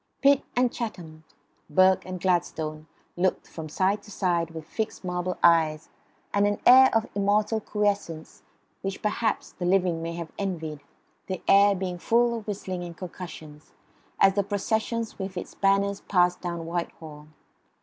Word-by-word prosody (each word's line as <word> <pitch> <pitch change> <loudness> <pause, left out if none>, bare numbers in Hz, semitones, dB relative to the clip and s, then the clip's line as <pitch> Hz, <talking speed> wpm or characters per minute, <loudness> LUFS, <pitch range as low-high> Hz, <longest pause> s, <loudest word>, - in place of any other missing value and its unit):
Pitt 280 0 +6
and 250 -1 +3
Chatham, 165 -9 -6 0.4
Burke 185 +4 +4
and 185 -1 -5
Gladstone 160 -4 -1 0.3
looked 185 +1 0
from 160 -2 -8
side 195 +6 +1
to 210 - -16
side 175 -4 0
with 160 -1 -8
fixed 215 +6 -4
marble 180 0 -2
eyes 160 -2 +4 0.4
and 205 0 +3
an 205 0 -1
air 260 +1 +9
of 225 0 +2
immortal 205 +2 +1
quiescence 205 -7 -2 0.4
which 195 0 -5
perhaps 215 +1 -1
the - - -8
living 180 -3 +2
may 165 0 -4
have 170 -1 -6
envied, 160 -7 -4 0.5
the 185 -2 -4
air 200 0 +6
being 180 -1 -4
full 235 +4 +2
of 220 -2 -7
whistling 190 -3 -4
and 170 -1 -8
concussions, 160 -4 -9 0.5
as 195 0 +6
the 200 - +2
procession 220 +3 -1
with 190 -1 -5
its - - -6
banners 200 0 +1
passed 180 -2 +2
down 170 -2 -4
Whitehall. 160 -3 -6
185 Hz, 150 wpm, -26 LUFS, 170-205 Hz, 0.5 s, air